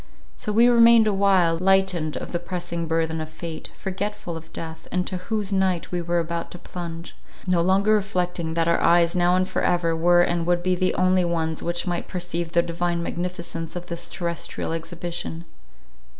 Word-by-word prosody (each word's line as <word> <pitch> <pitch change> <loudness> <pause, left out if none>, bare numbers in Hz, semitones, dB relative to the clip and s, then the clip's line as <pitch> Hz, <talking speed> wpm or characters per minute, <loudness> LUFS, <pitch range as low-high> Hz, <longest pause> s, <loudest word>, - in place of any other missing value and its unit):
So 210 - -4
we 230 +3 +5
remained 235 -1 +7
awhile, 195 -5 +3
lightened 185 -4 +2
of - - -6
the 175 - -1
pressing 175 -1 -4
burthen 160 0 0
of 155 - -5
fate, 160 0 -7
forgetful 195 -2 -4
of 160 0 -10
death, 160 -1 -8
into 180 0 -1
whose 205 +2 -2
night 190 -3 0
we 175 -1 -1
were 170 +1 -1
about 170 0 -2
to - - -9
plunge; 170 -1 -7 0.3
no 180 -2 +2
longer 195 +4 +3
reflecting 180 -5 -1
that 165 0 +1
our 170 - +3
eyes 170 +1 +4
now 175 0 +3
and 185 0 +2
for - - -2
ever 170 -2 +1
were 175 +2 +4
and 170 -1 0
would 175 0 +2
be 185 0 +2
the 185 +1 0
only 185 0 +3
ones 165 -2 -1
which 175 0 -2
might 175 -1 -2
perceive 175 -2 -4
the 170 - +4
divine 170 0 -1
magnificence 170 -1 -4
of 175 0 -5
this 170 0 -7
terrestrial 170 -2 -4
exhibition. 170 0 -5
175 Hz, 180 wpm, -24 LUFS, 170-185 Hz, 0.3 s, remained